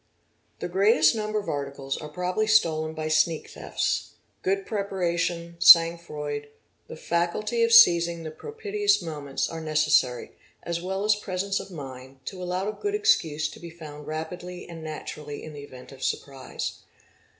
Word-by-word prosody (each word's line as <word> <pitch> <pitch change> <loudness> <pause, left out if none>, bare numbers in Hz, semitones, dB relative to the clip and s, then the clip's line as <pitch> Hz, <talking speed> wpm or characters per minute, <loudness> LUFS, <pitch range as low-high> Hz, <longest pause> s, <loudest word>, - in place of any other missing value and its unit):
The - - -2
greatest 180 -4 +4
number 215 -1 -2
of 205 - -3
articles 140 -1 -3
are 150 - -7
probably 180 +7 -1
stolen 160 -7 +2
by 155 0 -3
sneak 155 +1 +1
thefts. - - -2 0.3
Good 195 +1 0
preparation, 175 -4 -2
sang 170 0 +8
froid, 145 -3 -5 0.4
the - - -8
faculty 175 +8 -1
of 230 0 +3
seizing 170 -7 +6
the 155 - -6
propitious 415 - 0
moment 145 -4 -3
are 165 0 -5
necessary, 155 -5 +2 0.3
aS 170 0 -3
well 190 +3 -2
as 210 0 +4
presence 195 -1 -2
of - - -8
mind, 130 -4 -10
to 185 -2 -6
allow 180 +2 -2
a 215 - -2
good 410 - -2
excuse 160 - +2
to - - -12
be 170 - -9
found 150 -3 -10
rapidly 175 +3 -6
and 165 -2 -9
naturally 150 -1 -7
in 155 - -8
the 145 - -8
event 130 -3 -12
of 135 -1 -13
surprise. 135 -2 -4
170 Hz, 160 wpm, -26 LUFS, 150-195 Hz, 0.4 s, sang